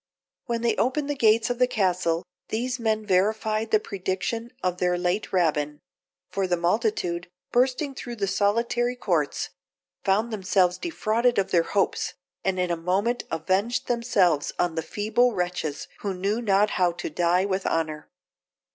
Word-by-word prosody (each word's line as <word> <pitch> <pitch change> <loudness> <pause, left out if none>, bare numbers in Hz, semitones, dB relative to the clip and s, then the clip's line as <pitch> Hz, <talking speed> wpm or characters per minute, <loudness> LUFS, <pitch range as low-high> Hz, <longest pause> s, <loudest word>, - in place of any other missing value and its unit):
When 235 -1 -1
they 230 -2 +2
opened 280 +3 0
the - - -2
gates 225 -1 +3
of 245 - -3
the 250 - +5
castle, 180 -6 +1 0.2
these 250 +3 -2
men 220 -2 0
verified 215 +3 +1
the 215 - +4
prediction 195 +4 -3
of 180 -1 0
their 180 0 +2
late 180 +4 -1
Rabbin; 150 -5 +1 0.5
for 195 -1 0
the 175 -1 +1
multitude, 175 -1 0 0.2
bursting 260 +3 +1
through 240 -2 -6
the 205 -3 -1
solitary 230 +5 +1
courts, 175 -5 -1 0.5
found 215 +4 +1
themselves 185 -3 +2
defrauded 240 -7 +1
of 195 -1 +1
their 170 - +5 0.2
hopes, 180 -2 +1 0.3
and 190 -1 0
in 180 -1 0
a - - +2
moment 195 +8 0
avenged 190 +9 0
themselves 200 - +2
on 175 -2 +1
the 160 - -1
feeble 215 +7 +1
wretches 175 -5 -2
who 200 -2 -3
knew 200 +5 -1
not 205 -1 +3
how 175 -1 +4
to 175 - -5
die 175 +4 +2
with 190 -1 -1
honour. 155 -2 -2
195 Hz, 155 wpm, -25 LUFS, 180-230 Hz, 0.5 s, the